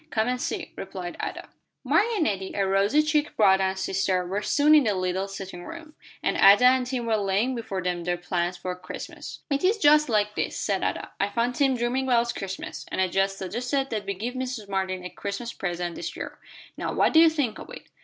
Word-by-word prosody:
"Come 220 -4 0
and 250 0 -1
see," - - -3
replied 185 -2 -6
Ada. - - -5 0.4
Mark 420 - +3
and 380 - +1
Nettie, 195 -8 -2
a 195 - +1
rosy 200 +10 +3
cheeked 300 -1 0
brother 190 -2 +5
and 190 0 -1
sister, 190 -1 0
were 195 +4 -2
soon 295 +6 +3
in 300 -4 +6
the 210 -2 +1
little 185 +1 -1
sitting 190 -2 -8
room, 325 - -10 0.3
and - - +1
Ada 200 +5 +7
and 255 0 +4
Tim 250 -2 -2
were 225 -1 +2
laying 205 +5 +1
before 200 -6 -4
them 175 -1 -2
their 175 0 -1
plans 175 0 -2
for 180 0 -4
Christmas. 180 0 -8
"It 280 +3 0
is 400 +5 +3
just 300 -5 +5
like 210 -2 +1
this," - - -2
said 195 -2 -1
Ada; - - -2
"I 200 - +1
found 235 +4 0
Tim 270 -1 +2
dreaming 245 +3 0
about 235 -2 +2
Christmas, 195 -1 -6
and - - -3
I 185 -1 +2
just 195 +2 0
suggested 245 +8 -2
that 210 -3 -3
we 200 - -2
give 230 +6 -4
Mrs. 255 -4 -4
Martin 190 -2 -2
a - - -4
Christmas 200 +4 -5
present 175 -2 -3
this - - -6
year. - - -7 0.4
Now - - -3
what - - +2
do 320 - +7
you 330 0 +8
think 290 -8 -2
of - - -10
it?" - - -9
205 Hz, 225 wpm, -26 LUFS, 190-255 Hz, 0.4 s, you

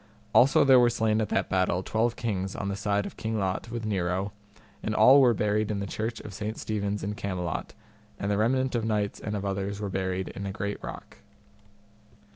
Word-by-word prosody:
Also 135 +3 +6
there 135 -2 +7
were 120 -1 +5
slain 110 -2 +1
at 110 - -2
that - - 0
battle 95 -1 +1
twelve 115 +4 0
kings 95 -5 -2
on 100 - -3
the 100 - -2
side 100 0 0
of - - -8
King 110 0 -2
Lot 95 +2 -2
with 115 -1 -4
Nero, 95 -1 -1 0.5
and 110 - -2
all 130 +6 +8
were 120 -3 +5
buried 105 +1 +1
in 105 -2 -1
the 100 - -2
Church 110 +3 -3
of 105 - -9
Saint 105 +3 -4
Stephen's 105 -1 -2
in 100 +2 -2
Camelot, 90 -5 -4 0.4
and 100 0 -1
the 100 - +1
remnant 130 +4 +1
of 120 -2 0
knights 105 -2 -1
and 105 0 -4
of 100 -1 -3
others 100 +1 -2
were 105 -1 -3
buried 95 0 -2
in 100 0 -6
a - - -3
great 100 0 -4
rock. - - -8
105 Hz, 210 wpm, -27 LUFS, 100-110 Hz, 0.5 s, all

